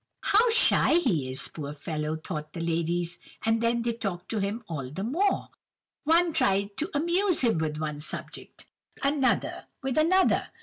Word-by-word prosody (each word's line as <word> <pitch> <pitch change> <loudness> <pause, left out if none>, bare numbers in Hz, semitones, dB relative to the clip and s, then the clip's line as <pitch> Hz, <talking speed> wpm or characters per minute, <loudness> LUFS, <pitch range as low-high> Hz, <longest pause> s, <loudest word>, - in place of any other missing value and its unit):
"'How 450 +4 +4
shy 455 -7 +5
he 180 - +1
is, 130 +3 0
poor 145 -2 -6
fellow!' 150 +1 -3
thought 155 -1 -6
the - - -6
ladies, 170 +1 -1 0.3
and 225 0 +2
then 235 0 +1
they 235 0 0
talked 195 -6 -5
to 220 - -1
him 205 +4 -2
all 140 -6 -5
the 185 +8 -5
more. 335 - 0 0.6
One 335 +2 +3
tried 200 -8 +1
to 315 - -1
amuse 345 +4 +2
him 230 -10 +2
with 155 -1 -2
one 150 -1 -3
subject, 150 - -5 0.4
another 275 -2 +1 0.2
with 265 +2 0
another. 370 +4 +3
205 Hz, 165 wpm, -27 LUFS, -, 0.6 s, shy